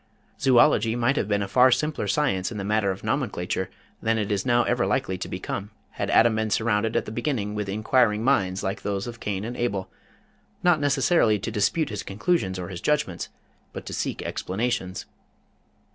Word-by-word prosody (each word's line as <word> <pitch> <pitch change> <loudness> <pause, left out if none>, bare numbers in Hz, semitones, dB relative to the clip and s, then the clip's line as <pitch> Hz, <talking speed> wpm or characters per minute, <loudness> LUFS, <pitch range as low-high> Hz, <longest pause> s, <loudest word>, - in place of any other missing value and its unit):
Zoölogy 120 -3 +4
might 120 +3 +2
have 105 - 0
been 100 -1 +1
a - - -4
far 125 +6 +5
simpler 145 -3 0
science 100 -6 0
in 110 - -5
the 100 - -3
matter 105 0 +1
of 95 0 -4
nomenclature 95 -8 -2 0.3
than 115 0 +1
it 105 -1 -2
is 100 -2 -1
now 120 0 +4
ever - - +1
likely 95 - 0
to - - -4
become, 95 +2 -4 0.2
had - - -3
Adam 115 -1 +4
been 110 0 0
surrounded 110 +1 +1
at - - +1
the - - -6
beginning 115 -4 -2
with 105 -2 -3
inquiring 110 +1 +2
minds 100 -8 +1
like 95 +1 -3
those 100 -1 -2
of 120 -1 -7
Cain 100 0 -3
and 120 +2 -5
Abel, 100 -6 -2 0.7
not 175 -3 +4
necessarily 145 -5 +3
to 105 +3 -4
dispute 110 +10 +1
his 105 -2 -4
conclusions 100 - -1
or 90 -1 -5
his 90 -2 -7
judgments, 150 - -1 0.4
but - - -7
to - - -6
seek - - -3
explanations. 100 -2 -3
110 Hz, 190 wpm, -25 LUFS, 100-120 Hz, 0.7 s, far